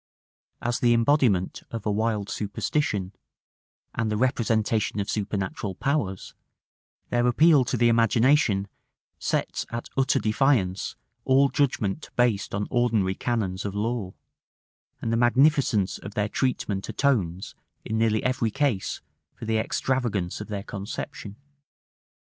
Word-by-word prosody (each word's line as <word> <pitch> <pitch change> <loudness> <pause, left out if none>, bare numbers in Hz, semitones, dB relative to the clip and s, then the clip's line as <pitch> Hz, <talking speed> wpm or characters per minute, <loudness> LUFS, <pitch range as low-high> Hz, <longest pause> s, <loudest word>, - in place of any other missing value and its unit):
As 120 0 0
the 120 -1 +4
embodiment 115 -6 +2
of 115 -3 -6
a 105 - +1
wild 105 -1 0
superstition, 105 -2 -2 0.8
and 115 -2 -1
the 105 - 0
representation 110 -3 +1
of 100 - -2
supernatural 100 -1 -3
powers, 110 -7 -2 0.8
their 120 0 +2
appeal 150 +3 +5
to 125 - -1
the 120 +1 +4
imagination 115 -2 +3 0.5
sets - - -1
at 120 +1 -5
utter 135 0 +2
defiance 110 -5 +1 0.3
all 135 +1 +4
judgment 135 -4 -1
based 115 -5 +1
on 105 +1 -1
ordinary 115 -6 +2
canons 95 -4 -2
of 100 -1 -4
law; 105 -3 -2 0.9
and 115 - 0
the - - +2
magnificence 125 - +3
of 100 +1 -9
their 105 0 +1
treatment 105 -6 -1
atones, 100 -10 0 0.3
in 110 0 -1
nearly 110 -1 +2
every 125 -3 +1
case, 120 -4 -1 0.3
for - - -8
the 110 0 +1
extravagance 110 -7 -1
of 105 - -6
their 100 -2 -4
conception. 100 0 -6
110 Hz, 125 wpm, -26 LUFS, 100-125 Hz, 0.9 s, appeal